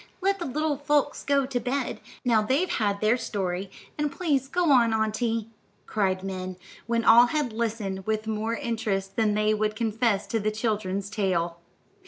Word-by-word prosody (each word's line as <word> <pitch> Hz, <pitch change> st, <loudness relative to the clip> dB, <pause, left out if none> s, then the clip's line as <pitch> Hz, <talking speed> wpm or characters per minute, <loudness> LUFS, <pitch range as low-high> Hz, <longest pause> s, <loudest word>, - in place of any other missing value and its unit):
Let 390 Hz, +1 st, +1 dB
the 345 Hz, -, -3 dB
little 300 Hz, +2 st, -1 dB
folks 290 Hz, 0 st, +1 dB
go 280 Hz, -1 st, +2 dB
to 260 Hz, -2 st, -2 dB
bed, 260 Hz, +1 st, -2 dB, 0.2 s
now 230 Hz, -3 st, +4 dB
they've 270 Hz, +12 st, +1 dB
had 200 Hz, -3 st, 0 dB
their 215 Hz, +3 st, +3 dB
story, 190 Hz, -4 st, -3 dB, 0.3 s
and 295 Hz, -1 st, 0 dB
please 280 Hz, -7 st, 0 dB
go 345 Hz, +1 st, +1 dB
on, 235 Hz, -4 st, +5 dB
auntie," 225 Hz, +1 st, -1 dB, 0.3 s
cried 190 Hz, -3 st, 0 dB
Min, 185 Hz, -1 st, -5 dB, 0.3 s
when 230 Hz, 0 st, 0 dB
all 235 Hz, +2 st, +8 dB
had 285 Hz, -4 st, -1 dB
listened 215 Hz, -4 st, -3 dB
with 215 Hz, 0 st, 0 dB
more 220 Hz, +1 st, -1 dB
interest 210 Hz, -5 st, -2 dB
than 220 Hz, -3 st, +2 dB
they 215 Hz, 0 st, +2 dB
would 215 Hz, 0 st, 0 dB
confess 220 Hz, -2 st, 0 dB
to 225 Hz, -, -1 dB
the 215 Hz, +1 st, 0 dB
children's 210 Hz, -3 st, -2 dB
tale. 175 Hz, -5 st, -1 dB
220 Hz, 170 wpm, -26 LUFS, 205-255 Hz, 0.3 s, all